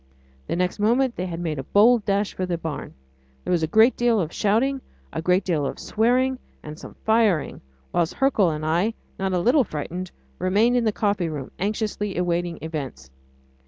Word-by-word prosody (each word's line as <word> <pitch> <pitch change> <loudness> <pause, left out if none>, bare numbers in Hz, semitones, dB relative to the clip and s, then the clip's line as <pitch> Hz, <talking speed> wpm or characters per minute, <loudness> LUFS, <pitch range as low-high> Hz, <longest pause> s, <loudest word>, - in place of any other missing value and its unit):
The - - -1
next 180 +3 -1
moment 235 +4 +2
they 185 - -3
had 170 -2 -5
made 160 -4 -3
a - - -4
bold 220 - +4
dash 200 0 0
for 185 - -3
the 175 -1 -1
barn. 160 -2 -6 0.5
There - - -3
was 175 -2 +2
a 160 - +1
great 220 +8 +5
deal 240 -2 +2
of 165 -4 -2
shouting, 250 +6 +1 0.3
a - - -2
great 180 +3 +2
deal 165 -6 0
of 140 - -3
swearing 250 +4 +1 0.2
and 155 +1 -8
some - - -11
firing, 220 -9 +2 0.3
whilst 170 -1 +1
Hercule 270 -9 +3
and 155 -1 -3
I, 175 +8 +1 0.2
not 190 0 -1
a - - +2
little 255 - +4
frightened, 175 +2 -5 0.3
remained 215 +6 +3
in 245 -2 +2
the 215 - +3
coffee 200 -5 0
room, 145 -4 -6
anxiously 210 -1 -2
awaiting 175 -1 -1
events. 135 - -6
190 Hz, 190 wpm, -24 LUFS, 165-225 Hz, 0.5 s, great